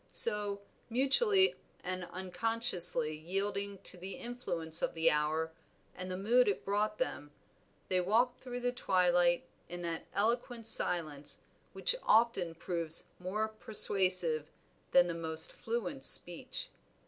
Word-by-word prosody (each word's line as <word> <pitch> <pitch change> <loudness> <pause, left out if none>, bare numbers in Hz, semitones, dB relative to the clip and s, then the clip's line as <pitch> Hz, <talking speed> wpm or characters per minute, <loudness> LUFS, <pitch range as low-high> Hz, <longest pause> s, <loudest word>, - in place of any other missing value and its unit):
So, 205 -2 +2 0.3
mutually 380 - +3 0.3
and 185 0 -4
unconsciously 185 -4 +2
yielding 195 +5 -3
to 180 - -4
the 190 +2 -7
influence 170 -10 -1
of - - -1
the 165 0 +3
hour 155 +2 0 0.4
and 185 0 -6
the 185 - -4
mood 235 +6 +3
it 200 - -1
brought 210 +2 0
them, 145 - -3 0.6
they 185 -1 +1
walked 235 +7 +1
through 245 -1 -6
the 245 0 0
twilight 175 -6 +2 0.2
in 175 0 -6
that 165 -1 -4
eloquent 230 +2 -1
silence 155 -9 0 0.3
which - - 0
often 215 -7 +2
proves 165 -1 0
more 200 +4 -2
persuasive 185 -7 +1 0.4
than 180 - +5
the 175 - -3
most 160 -1 0
fluent 240 +4 -4
speech. - - +2
190 Hz, 125 wpm, -33 LUFS, 170-225 Hz, 0.6 s, than